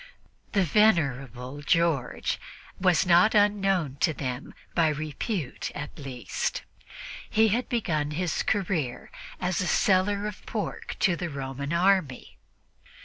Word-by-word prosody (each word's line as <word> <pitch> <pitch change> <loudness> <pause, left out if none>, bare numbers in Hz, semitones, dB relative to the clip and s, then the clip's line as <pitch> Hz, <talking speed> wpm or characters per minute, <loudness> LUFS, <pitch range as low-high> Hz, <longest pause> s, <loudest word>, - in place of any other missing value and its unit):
The 200 -3 +3
"venerable" 140 - +1
George 165 -3 +1 0.4
was 180 -1 +3
not 180 +5 +5
unknown 195 -8 +2
to 160 - +2
them 125 -3 -5 0.2
by 165 -2 +3
repute, 155 - -3
at 145 0 -6
least. 130 -6 -3 0.7
He 220 +1 +4
had 235 +5 0
begun 160 -11 0
his 165 +2 -1
career 170 - -1 0.3
as 180 0 -1
seller 195 +2 +2
of 210 -1 -6
pork - - -4
to 180 -4 +4
the 175 0 -4
Roman 140 0 -5
army. 170 -6 +1
170 Hz, 115 wpm, -27 LUFS, 140-195 Hz, 0.7 s, not